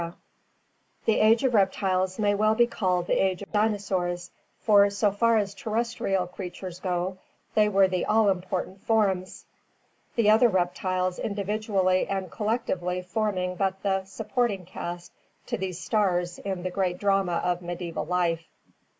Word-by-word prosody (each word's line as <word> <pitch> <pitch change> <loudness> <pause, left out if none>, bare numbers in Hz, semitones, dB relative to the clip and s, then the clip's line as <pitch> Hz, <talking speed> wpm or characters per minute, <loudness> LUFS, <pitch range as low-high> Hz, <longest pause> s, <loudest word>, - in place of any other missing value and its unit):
DINOSAURS 170 0 -6 0.9
The 220 - +3
Age 225 +3 +5
of 260 -2 +2
Reptiles 190 -2 +1
may 205 -1 +2
well 215 +2 +2
be 240 +1 +5
called 185 -6 0
the - - +2
Age 190 0 0
of - - -13
Dinosaurs, 190 -5 -1 0.3
for 205 -2 +5
so 200 +1 +1
far 230 +3 +3
as 200 -2 -1
terrestrial 215 -3 -1
creatures 180 0 -8
go 185 0 -2 0.3
they 210 -1 +4
were 195 -1 +4
the 185 -1 -1
all 220 -1 +4
important 185 +1 -4
forms, 195 -5 0 0.7
the 230 -3 +2
other 225 +3 +6
reptiles 185 -1 -1
individually 200 -2 0
and 190 -3 -3
collectively 190 -5 -2
forming 185 -2 -1
but 190 0 -1
the 190 -1 +1
supporting 215 -1 -2
caste 175 0 -7 0.3
to - - -2
these 185 -2 -4
stars 180 -1 0
in 190 -3 -4
the 185 - -2
great 180 -1 -1
drama 195 -3 +1
of 175 +1 0
medieval 175 -1 -4
life. 170 -2 0
190 Hz, 150 wpm, -26 LUFS, 180-210 Hz, 0.9 s, other